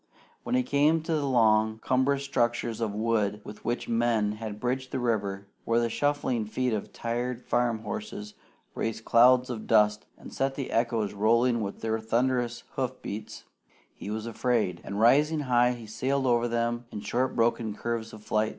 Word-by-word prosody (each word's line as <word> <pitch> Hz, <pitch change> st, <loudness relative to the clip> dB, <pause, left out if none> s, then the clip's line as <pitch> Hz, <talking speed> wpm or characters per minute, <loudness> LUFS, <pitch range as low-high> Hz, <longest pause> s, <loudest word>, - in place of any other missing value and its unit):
When 250 Hz, -, -2 dB
he 255 Hz, -, +3 dB
came 155 Hz, -, +2 dB
to 165 Hz, -, -2 dB
the 145 Hz, -3 st, 0 dB
long 110 Hz, -3 st, +3 dB
cumbrous 130 Hz, +4 st, +1 dB
structures 120 Hz, -4 st, -1 dB
of 110 Hz, -2 st, 0 dB
wood 105 Hz, -2 st, 0 dB
with 105 Hz, -, -10 dB
which 120 Hz, +1 st, -2 dB
men 115 Hz, -3 st, +1 dB
had 105 Hz, -1 st, -6 dB
bridged 130 Hz, +2 st, -2 dB
the -, -, -3 dB
river, 100 Hz, -5 st, -1 dB, 0.2 s
where 115 Hz, 0 st, +2 dB
the 115 Hz, -1 st, 0 dB
shuffling 145 Hz, -5 st, 0 dB
feet 125 Hz, +2 st, -1 dB
of 105 Hz, -, -3 dB
tired 120 Hz, +1 st, -3 dB
farm 120 Hz, -2 st, 0 dB
horses 105 Hz, 0 st, -6 dB, 0.4 s
raised 110 Hz, 0 st, -3 dB
clouds 125 Hz, +2 st, +5 dB
of 110 Hz, -3 st, -6 dB
dust 105 Hz, -1 st, +3 dB
and -, -, -12 dB
set 135 Hz, 0 st, -1 dB
the 140 Hz, -, -4 dB
echoes 115 Hz, -3 st, 0 dB
rolling 115 Hz, +3 st, +2 dB
with 100 Hz, -1 st, -5 dB
their 110 Hz, 0 st, -1 dB
thunderous 120 Hz, +1 st, 0 dB
hoof 130 Hz, -1 st, -3 dB
beats, 105 Hz, +2 st, -6 dB, 0.5 s
he -, -, -8 dB
was 110 Hz, +1 st, -3 dB
afraid; 115 Hz, -6 st, 0 dB
and 100 Hz, +1 st, -4 dB
rising 150 Hz, +7 st, +4 dB
high, 125 Hz, -2 st, +3 dB
he 120 Hz, -2 st, -9 dB
sailed 135 Hz, +5 st, -1 dB
over 120 Hz, -1 st, +3 dB
them 120 Hz, 0 st, -1 dB
in 105 Hz, -, -6 dB
short 125 Hz, +5 st, -1 dB
broken 115 Hz, -2 st, +1 dB
curves 115 Hz, 0 st, -3 dB
of 105 Hz, -1 st, -12 dB
flight. 110 Hz, 0 st, +1 dB
115 Hz, 180 wpm, -28 LUFS, 110-125 Hz, 0.5 s, clouds